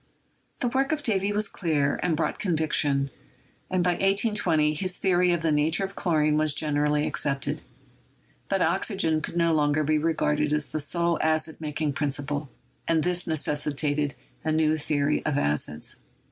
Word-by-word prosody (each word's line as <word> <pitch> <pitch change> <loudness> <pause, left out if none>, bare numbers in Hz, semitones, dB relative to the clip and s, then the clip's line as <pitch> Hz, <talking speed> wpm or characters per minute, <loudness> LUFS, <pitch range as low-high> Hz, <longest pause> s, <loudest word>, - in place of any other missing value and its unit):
The 250 - +1
work 270 +4 0
of 305 -2 -1
Davy 200 -2 +1
was 210 0 +1
clear 150 -6 0
and 165 -3 0
brought 165 - -1
conviction, 150 -5 +1 0.6
and 185 -1 +1
by 180 - +3
1820 195 -5 +2
his 185 +4 -2
theory 180 -1 +2
of 170 -1 -1
the 160 - +2
nature 155 +5 +2
of 195 0 -4
chlorine 155 -3 +1
was 155 -2 +3
gen 150 0 -1
erally 150 +1 +1
accepted. 140 -2 -1 0.9
But - - +1
oxygen 160 -1 +1
could 170 - -5
no 170 -1 +3
longer 150 0 +2
be 155 +1 +1
regarded 150 -2 0
as 150 -1 0
the 155 - -3
sole 170 +3 +1
acid 155 0 -1
making 150 -1 -2
principle, 145 0 -3 0.4
and 160 -2 +2
this 180 0 0
necessitated 145 -1 0 0.3
a 155 - 0
new 155 0 +2
theory 150 -1 0
of 150 -2 -1
acids. 75 - 0
155 Hz, 160 wpm, -26 LUFS, 150-175 Hz, 0.9 s, by